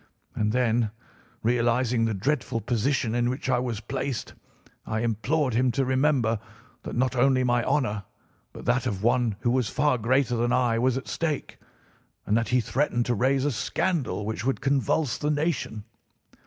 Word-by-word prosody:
And 105 0 0
then, 120 -2 +2 0.5
realising 120 0 +2
the 110 -2 0
dreadful 125 +2 -1
position 120 +1 0
in 120 0 +1
which 130 +1 -2
I 125 - +3
was 120 -4 -3
placed, 125 +3 -4 0.5
I 110 0 -2
implored 125 +5 0
him 125 +3 +3
to 135 +3 +1
remember 130 -4 +2 0.4
that - - -6
not 130 +1 +1
only 130 +1 +3
my 120 -1 +2
honour 115 -8 0 0.5
but - - -10
that 125 +1 +1
of 100 -3 -3
one 120 -2 +2
who 120 - +1
was 125 -4 +1
far 145 -4 +1
greater 125 +2 +2
than 120 +1 +1
I 120 -2 +2
was 130 +1 +2
at 130 - -6
stake; 155 -3 -3 0.7
and 105 - +1
that 115 0 +1
he 125 0 +3
threatened 120 0 0
to 120 - +1
raise 130 +4 +1
a 145 - +2
scandal 135 - -1
which 110 -1 -3
would 135 +1 0
convulse 135 0 +1
the 150 - -1
nation. 145 -8 -1
125 Hz, 170 wpm, -26 LUFS, 115-130 Hz, 0.7 s, I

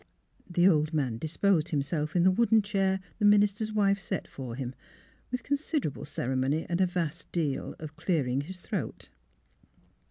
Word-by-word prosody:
The 175 +1 +4
old 155 -3 +3
man 130 -7 0
disposed 160 - +1
himself 150 +1 -1
in 175 - +4
the 185 - +6
wooden 225 +1 +4
chair 195 -2 +1 0.2
the 210 - +2
minister's 205 +1 +4
wife 200 -2 +2
set 195 - -4
for 125 -4 -7
him, 130 -1 -4 0.6
with 250 -1 -3
con 285 +3 +1
siderable 280 - -2
ceremony 130 +3 -1
and 175 +2 0
a 185 - +4
vast 170 -2 -3
deal 155 -6 -1
of 155 0 -9
clearing 140 -7 0
his 180 +5 -8
throat. - - -4
175 Hz, 160 wpm, -29 LUFS, 150-200 Hz, 0.6 s, the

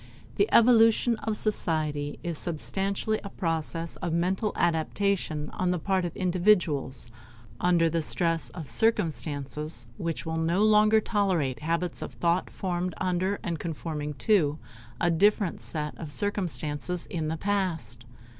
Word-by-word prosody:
The 405 - +3
evolution 230 0 +5
of 220 0 -2
society 155 -8 -1
is 170 -1 -2
substantially 195 +6 -2
a 200 - -6
process 165 -2 -3
of 170 - -3
mental 185 +5 +1
adaptation 165 -2 0
on 185 - -1
the 180 - +1
part 190 +2 0
of 170 - -5
individuals 175 - +2 0.5
under 175 -2 +3
the 165 0 0
stress 165 +1 0
of 160 -5 -8
circumstances 150 - -1
which 165 -1 -3
will 160 0 -2
no 170 +5 +2
longer 215 0 +5
tolerate 185 - 0
habits 170 +3 -2
of - - -6
thought 170 +1 +1
formed 180 -2 -3
under 185 +2 0
and 170 -6 -2
conforming 150 -2 -4
to 160 -9 +3 0.4
a 175 - +2
different 200 +2 +2
set 150 -2 -4
of 155 -3 -6
circumstances 180 -3 -1
in 160 -3 -3
the 160 +1 -2
past. 165 - -2
170 Hz, 135 wpm, -28 LUFS, 155-195 Hz, 0.5 s, evolution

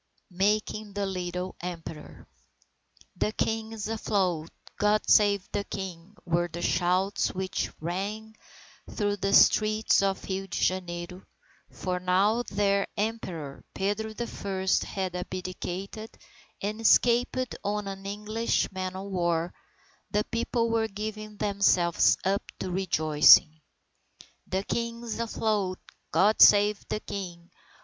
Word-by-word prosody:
MAKING 210 +2 0
THE 200 0 -1
LITTLE 180 -1 -4
EMPEROR 165 -3 -8 0.9
"The 210 - 0
King 220 0 -1
is 220 -2 -5
afloat! 190 -7 -1 0.3
God 210 +1 +2
save 200 -2 +4
the 205 - -1
King!" 190 -1 -7
were 175 0 +1
the 175 0 -6
shouts 185 +3 +1
which 185 0 -2
rang 205 +6 -4 0.5
through 205 -1 -1
the 195 0 -1
streets 215 +1 +5
of 195 -1 0
Rio 195 0 -3
Janeiro, 180 -1 -2 0.5
for 180 -1 -3
now 185 +5 +2
that 240 - -3
their 200 -1 +1
Emperor 185 -10 -4
Pedro 205 +3 -2
the 235 +2 -4
First 190 -4 -1
had 190 -2 -3
abdicated 185 +3 -5 0.5
and 210 +2 -3
escaped 245 +2 +3
on 205 0 -2
an 195 0 -6
English 210 +3 -1
man 185 -1 -4
o 190 - -5
war, 175 -3 -1 0.6
the 210 0 +1
people 230 0 -1
were 225 -1 +1
giving 215 0 -6
themselves 195 -4 +3
up 195 +1 +2 0.2
to 185 - -4
rejoicing. 155 -3 +5 0.9
"The 190 +1 -1
King 235 +2 -3
is 230 -1 -5
afloat! 215 -5 -1 0.3
God 210 +3 +3
save 205 0 +7
the 215 - -2
King!" 175 -3 -7
195 Hz, 125 wpm, -28 LUFS, 180-215 Hz, 0.9 s, save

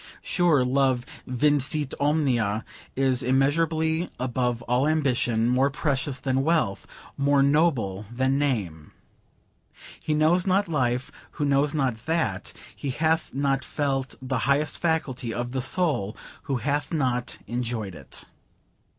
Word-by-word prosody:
Sure, 165 -8 +3
love 130 -1 +1 0.2
vincit 145 +2 +1
omnia; 125 -8 +1 0.3
is 130 -2 +2
immeasurably 160 +5 +1
above 125 -1 -1
all 125 +4 +1
ambition, 125 -7 +1
more 130 +3 +3
precious 140 -2 -1
than 130 0 0
wealth, 140 -10 0 0.3
more 140 0 +3
noble 135 - +1
than 130 +3 +1
name. 100 - -2 1.1
He 155 - -1
knows 165 +5 +3
not 195 +1 +2
life 125 -5 -1 0.2
who 150 - -2
knows 140 +2 +2
not 125 -5 -1
that: 160 - -1 0.2
he 140 - -4
hath 160 +2 0
not 135 -1 +1
felt 135 -3 -2
the 130 -1 -1
highest 145 +2 +1
faculty 140 -8 -1
of 120 +1 -3
the 130 0 -2
soul 130 - 0 0.3
who 135 - +1
hath 140 +4 -1
not 125 -6 -1
enjoyed 115 -5 -3
it. 80 - -9
135 Hz, 125 wpm, -25 LUFS, 125-150 Hz, 1.1 s, Sure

